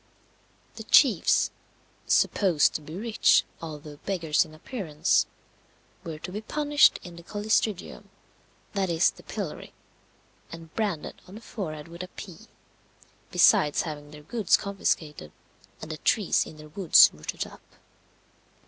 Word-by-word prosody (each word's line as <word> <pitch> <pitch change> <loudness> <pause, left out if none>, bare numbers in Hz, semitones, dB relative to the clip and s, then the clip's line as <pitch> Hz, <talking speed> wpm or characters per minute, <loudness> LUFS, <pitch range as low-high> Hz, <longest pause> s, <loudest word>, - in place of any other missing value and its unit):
The - - -6
chiefs, - - +4 0.6
"supposed 175 -7 +3
to - - -4
be 155 +2 -10
rich, 220 +3 +3 0.2
although 150 -2 -8
beggars 165 -4 0
in 155 -1 -14
appearance," 160 - 0 0.8
were 160 -2 -6
to 180 - -8
be 210 +3 -5
punished 295 +5 +3
in 175 -2 -11
the - - -10
collistrigium 210 0 -2 0.6
that 195 -3 -1
is, 165 -1 +3
the - - -16
pillory - - -6 0.8
and 165 -1 -11
branded 200 -8 -3
on 185 - -12
the 220 - -10
forehead 155 -11 -6
with 170 +1 -9
a 180 - -6
P, 180 -2 -11 0.8
besides 150 -1 +4
having 145 -3 -7
their 150 0 -13
goods 220 +6 +2
confiscated, 155 - -3 0.5
and 155 - -6
the 155 - -5
trees 205 +4 +1
in 155 - -12
their 155 0 -12
woods 175 +1 +6
rooted 75 0 -5
up. - - -14
170 Hz, 135 wpm, -26 LUFS, 155-200 Hz, 0.8 s, woods